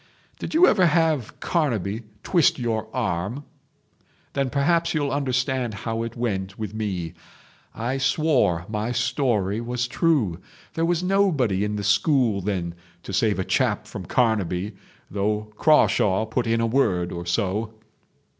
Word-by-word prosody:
Did -, -, -5 dB
you 345 Hz, +3 st, +7 dB
ever 190 Hz, -, +4 dB
have 160 Hz, -6 st, +1 dB
Carnaby 115 Hz, -, 0 dB, 0.2 s
twist 170 Hz, -4 st, +3 dB
your 115 Hz, -3 st, -2 dB
arm? 115 Hz, +2 st, -2 dB, 0.9 s
Then 135 Hz, -1 st, 0 dB
perhaps 165 Hz, +5 st, +1 dB
you'll 145 Hz, -2 st, 0 dB
understand 130 Hz, -4 st, -1 dB
how 115 Hz, -1 st, -1 dB
it 115 Hz, 0 st, -5 dB
went 100 Hz, -5 st, -3 dB
with 110 Hz, -2 st, -5 dB
me. 95 Hz, -7 st, -3 dB, 0.6 s
I 125 Hz, +4 st, -2 dB
swore 135 Hz, -, +2 dB
my 110 Hz, +2 st, -2 dB
story 120 Hz, -4 st, 0 dB
was 120 Hz, +1 st, -2 dB
true. 125 Hz, -, +1 dB, 0.3 s
There 165 Hz, -, 0 dB
was 175 Hz, 0 st, 0 dB
nobody 160 Hz, -, +2 dB
in 105 Hz, 0 st, -1 dB
the 105 Hz, -, -3 dB
school 110 Hz, 0 st, +2 dB
then 90 Hz, -3 st, -2 dB, 0.3 s
to 100 Hz, -, -7 dB
save 105 Hz, +2 st, +2 dB
a 95 Hz, -, -1 dB
chap -, -, +1 dB
from -, -, -8 dB
Carnaby 105 Hz, -4 st, 0 dB, 0.4 s
though 105 Hz, +2 st, -2 dB
Crawshaw 110 Hz, -8 st, +3 dB
put 115 Hz, +2 st, -2 dB
in 115 Hz, 0 st, +1 dB
a -, -, +2 dB
word 105 Hz, -8 st, +1 dB
or 85 Hz, 0 st, -6 dB
so. 105 Hz, +4 st, -1 dB
115 Hz, 145 wpm, -24 LUFS, 100-140 Hz, 0.9 s, you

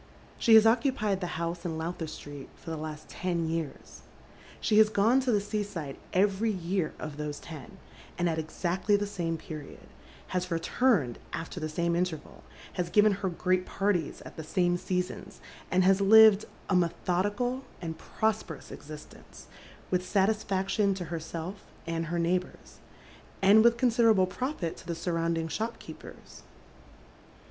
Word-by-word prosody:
She 225 Hz, -2 st, +6 dB
has 220 Hz, 0 st, +8 dB
occupied 225 Hz, -4 st, +2 dB
the 175 Hz, -2 st, -3 dB
house 170 Hz, +1 st, -3 dB
in 165 Hz, -2 st, -3 dB
Lowther 165 Hz, 0 st, -4 dB
Street 145 Hz, -2 st, -9 dB
for 165 Hz, -, -9 dB
the -, -, -2 dB
last 155 Hz, 0 st, -6 dB
ten 170 Hz, -2 st, -2 dB
years. 160 Hz, -3 st, -5 dB, 0.6 s
She 215 Hz, -1 st, +3 dB
has 215 Hz, -1 st, +7 dB
gone 220 Hz, +5 st, +3 dB
to 260 Hz, -2 st, 0 dB
the 210 Hz, -, +3 dB
sea 205 Hz, +1 st, -2 dB
side 165 Hz, -9 st, -5 dB, 0.2 s
every 200 Hz, +3 st, +2 dB
year 185 Hz, -3 st, -1 dB
of 155 Hz, -2 st, -7 dB
those 150 Hz, -1 st, -4 dB
ten, 155 Hz, -6 st, -10 dB, 0.4 s
and 175 Hz, -, +1 dB
at 160 Hz, -1 st, 0 dB
exactly 175 Hz, +5 st, 0 dB
the 205 Hz, 0 st, 0 dB
same 175 Hz, -5 st, -2 dB
period, 155 Hz, -2 st, -9 dB, 0.4 s
has 180 Hz, 0 st, -2 dB
returned 165 Hz, -, +1 dB
after 165 Hz, +2 st, -5 dB
the 155 Hz, -1 st, -3 dB
same 170 Hz, +2 st, 0 dB
intei 175 Hz, -2 st, 0 dB
val, -, -, -16 dB, 0.3 s
has 175 Hz, -1 st, -2 dB
given 210 Hz, +3 st, +5 dB
her 195 Hz, -1 st, -1 dB
great 180 Hz, +1 st, +1 dB
parties 195 Hz, -6 st, -1 dB
at -, -, -11 dB
the 160 Hz, -, -5 dB
same 175 Hz, +2 st, +1 dB
seasons, 180 Hz, 0 st, -3 dB, 0.3 s
and 185 Hz, 0 st, +3 dB
has 190 Hz, +1 st, +4 dB
lived 215 Hz, 0 st, +8 dB, 0.2 s
a 190 Hz, -, +1 dB
methodical 205 Hz, +8 st, 0 dB, 0.2 s
and 160 Hz, -2 st, -6 dB
prosperous 215 Hz, -8 st, -2 dB
existence, 150 Hz, 0 st, -11 dB, 0.5 s
with 180 Hz, 0 st, +1 dB
satis 205 Hz, +3 st, +2 dB
faction 195 Hz, +1 st, +1 dB
to 185 Hz, -2 st, -5 dB
herself 165 Hz, +4 st, -5 dB, 0.2 s
and 165 Hz, 0 st, -2 dB
her 170 Hz, +1 st, -2 dB
neighbours, 180 Hz, +2 st, -2 dB, 0.6 s
and 205 Hz, +3 st, +6 dB
with 235 Hz, 0 st, +5 dB
considerable 230 Hz, -5 st, +4 dB
profit 195 Hz, -, -3 dB
to -, -, -13 dB
the 170 Hz, -, -2 dB
surrounding 165 Hz, -1 st, -1 dB
shopkeepers. 225 Hz, +7 st, -7 dB
180 Hz, 155 wpm, -29 LUFS, 165-205 Hz, 0.6 s, has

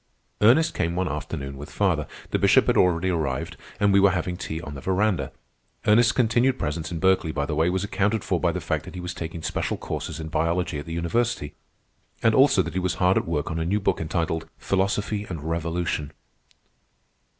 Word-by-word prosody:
Ernest 125 Hz, +10 st, +5 dB
came 85 Hz, 0 st, -1 dB
one 90 Hz, +1 st, 0 dB
afternoon 70 Hz, -3 st, -5 dB
with 75 Hz, +2 st, -8 dB
father. 85 Hz, -7 st, 0 dB, 0.2 s
The -, -, +1 dB
Bishop -, -, +5 dB
had -, -, +2 dB
already 90 Hz, 0 st, +3 dB
arrived, 80 Hz, -2 st, -2 dB, 0.2 s
and 100 Hz, -1 st, +3 dB
we 100 Hz, -, +6 dB
were 100 Hz, 0 st, +6 dB
having 90 Hz, -1 st, -2 dB
tea 80 Hz, -2 st, -5 dB
on 80 Hz, -3 st, -7 dB
the 70 Hz, -, -8 dB
veranda. 95 Hz, +1 st, 0 dB, 0.5 s
Ernest's 115 Hz, +2 st, +5 dB
continued 125 Hz, +2 st, +2 dB
presence 80 Hz, +1 st, -3 dB
in 85 Hz, -, -3 dB
Berkeley, 95 Hz, -2 st, +2 dB
by 70 Hz, -1 st, -1 dB
the 75 Hz, -, -3 dB
way, 80 Hz, +3 st, +2 dB
was 95 Hz, +1 st, -1 dB
accounted 100 Hz, +1 st, 0 dB
for -, -, 0 dB
by -, -, +2 dB
the -, -, -3 dB
fact -, -, -2 dB
that -, -, -10 dB
he -, -, -5 dB
was 90 Hz, 0 st, -5 dB
taking 80 Hz, -1 st, -6 dB
special -, -, -2 dB
courses -, -, -5 dB
in 80 Hz, 0 st, -5 dB
biology 85 Hz, 0 st, 0 dB
at 75 Hz, -, -8 dB
the 80 Hz, -, -5 dB
university, 85 Hz, -1 st, -1 dB, 0.7 s
and 115 Hz, -1 st, +4 dB
also 130 Hz, -7 st, +5 dB
that -, -, -6 dB
he 95 Hz, -, 0 dB
was 90 Hz, -1 st, -1 dB
hard 90 Hz, +1 st, +3 dB
at -, -, 0 dB
work 80 Hz, -2 st, -1 dB
on 80 Hz, -, -2 dB
a -, -, 0 dB
new 95 Hz, +6 st, +1 dB
book 95 Hz, -3 st, 0 dB
entitled 80 Hz, 0 st, -2 dB
"Philosophy 100 Hz, +2 st, -1 dB
and 80 Hz, -5 st, -5 dB
Revolution." 80 Hz, -2 st, -2 dB
90 Hz, 205 wpm, -25 LUFS, 80-100 Hz, 0.7 s, we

